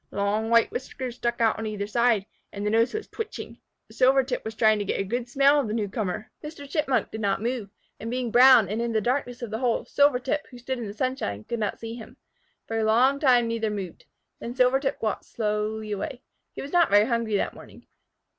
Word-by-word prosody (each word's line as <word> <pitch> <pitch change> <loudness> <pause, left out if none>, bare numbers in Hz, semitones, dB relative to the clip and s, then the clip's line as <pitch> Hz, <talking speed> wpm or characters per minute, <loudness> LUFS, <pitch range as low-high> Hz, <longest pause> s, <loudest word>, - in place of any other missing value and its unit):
Long 205 +2 -1
white 230 0 +4
whiskers 255 -1 -5
stuck 240 -1 -2
out 225 -1 +2
on 220 - -3
either 210 -1 -3
side, 230 -2 +2 0.3
and 200 0 -5
the 210 - +1
nose 230 +2 +3
was 435 0 -5
twitching. 440 +1 -7 0.3
Silvertip 260 0 +2
was 220 0 -6
trying 215 -1 +4
to - - -1
get 200 - -2
a - - +1
good 240 +5 -3
smell 275 +3 +4
of 270 - -1
the 215 - -2
new 215 -3 -1
comer. 205 +1 -4
Mr. 300 -2 -8
Chipmunk 280 -3 0
did 220 - -6
not 200 -2 +1
move, 235 -2 -3 0.3
and 225 - -5
being 245 -1 -2
brown 250 -3 +7
and 215 +4 -2
in 235 -1 -2
the 220 - +3
darkness 245 +1 -2
of 230 - -5
the 220 - -3
hole, 245 -2 0
Silvertip, 285 0 +1
who 250 - -12
stood 250 +1 -4
in 230 - -4
the 200 - -6
sunshine, 235 - -2
could 235 - -4
not 210 -2 -2
see 225 0 -6
him. 230 -2 -11 0.5
For 225 0 -2
a - - +1
long 250 +6 +3
time 250 -5 +4
neither 230 -1 -1
moved. 195 -5 -6 0.3
Then 240 +1 -6
Silvertip 265 +2 +2
walked 215 -2 -2
slowly 215 0 -2
away. 245 +6 -4 0.3
He - - -6
was 280 - -9
not 345 -1 +4
very 205 +1 +5
hungry 230 -3 0
that - - -2
morning. - - -14
235 Hz, 220 wpm, -26 LUFS, 215-255 Hz, 0.5 s, brown